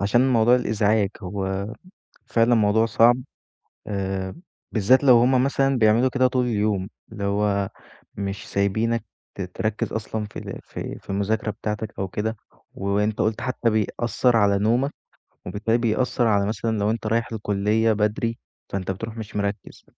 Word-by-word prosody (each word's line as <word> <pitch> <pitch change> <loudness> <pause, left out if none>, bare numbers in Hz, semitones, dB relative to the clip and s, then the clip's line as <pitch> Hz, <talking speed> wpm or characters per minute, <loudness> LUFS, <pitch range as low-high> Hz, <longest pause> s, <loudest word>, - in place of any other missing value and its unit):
عشان 120 +6 +3
موضوع 120 +1 +5
الإزعاج، 110 -4 +2
هو 95 +1 -3 0.6
فعلًا 115 +1 +3
موضوع 110 +1 +3
صعب. 115 +2 +5 0.7
آآ، 95 -2 -3 0.4
بالذات 125 +6 +4
لو 125 -3 +7
هُم 125 +1 +4
مثلًا 135 -1 +2
بيعملوا 115 +3 +4
كده 130 0 +3
طول 125 0 0
اليوم، 105 -4 0 0.2
اللي 105 -2 -6
هو، 100 -1 +1 0.5
مش 100 -1 -4
سايبينك 110 +3 0 0.3
ت - - -5
تركِّز 105 +4 -3
أصلًا 110 0 -3
في 105 - -7
في - - -7
في - - -25
المذاكرة 105 +2 0
بتاعتك 105 0 -5
أو 95 - -1
كده. 105 +4 -3 0.4
وأنت 105 +2 -1
قُلت 110 0 0
حتى 125 -2 0
بيأثِّر 115 +2 +1
على 100 -2 +3
نومك، 120 +7 +2 0.6
وبالتالي 110 +5 0
بيأثِّر 120 +2 +1
على 100 -2 +3
مثلًا 110 +1 -1
لو 105 +1 +1
أنت 110 -1 -3
رايح 115 +2 +1
الكلية 105 +1 +1
بدري، 110 +2 0 0.3
فأنت 95 -1 -3
بتروح 110 +4 -5
مش 110 -2 -7
مركِّز. 100 +1 -4
110 Hz, 145 wpm, -24 LUFS, 100-115 Hz, 0.7 s, لو